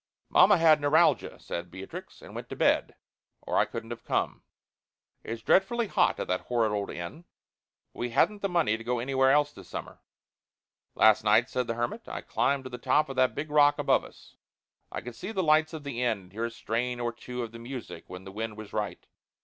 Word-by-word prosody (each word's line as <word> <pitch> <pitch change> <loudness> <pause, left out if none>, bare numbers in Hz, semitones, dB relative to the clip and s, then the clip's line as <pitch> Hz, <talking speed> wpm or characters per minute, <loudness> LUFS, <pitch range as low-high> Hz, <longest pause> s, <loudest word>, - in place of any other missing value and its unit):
"Mamma 205 - +6
had 160 -2 +5
neuralgia," 155 +4 +3
said 85 +1 -5
Beatrix, 95 +2 -9
"and - - -11
went - - -7
to - - -5
bed, - - +2 0.5
or - - +1
I - - +4
couldn't 115 0 -7
have 120 - -7
come. - - -1 0.8
It's 115 0 -6
dreadfully 235 +5 +3
hot - - +2
at - - -3
that 90 0 0
horrid 115 -3 +1
old 100 -1 -2
inn. 85 - -7 0.7
But - - -14
we 120 - -1
hadn't 200 - +2
the 200 - 0
money 165 -12 +2
to 115 - -10
go 125 +1 -1
anywhere 130 +2 +2
else 145 +1 +3
this - - -13
summer." - - -7 1.0
"Last 110 -1 +5
night," 110 +3 +4
said 125 -2 -1
the 115 - -2
hermit, 120 - -3
"I - - -5
climbed 140 -1 0
to 130 - -7
the 125 - -6
top 150 +4 +2
of 135 - -5
that 130 0 +3
big 150 +1 -4
rock 145 -1 +5
above 145 - +2
us. - - -16 0.5
I - - -4
could 125 - -8
see 190 - -6
the 190 -4 -1
lights 155 0 +4
of 160 -3 -7
the 130 -4 -4
inn 120 -3 +1
and 90 -1 -18
hear 110 +4 -3
a - - -2
strain 120 +2 -2
or 120 -1 -2
two 125 +1 -6
of 115 - -6
the 115 - -10
music 125 +1 -8
when 90 0 -9
the 95 - -9
wind 110 +1 -5
was 110 -2 -9
right. 105 -1 -3
125 Hz, 220 wpm, -28 LUFS, 115-150 Hz, 1.0 s, Mamma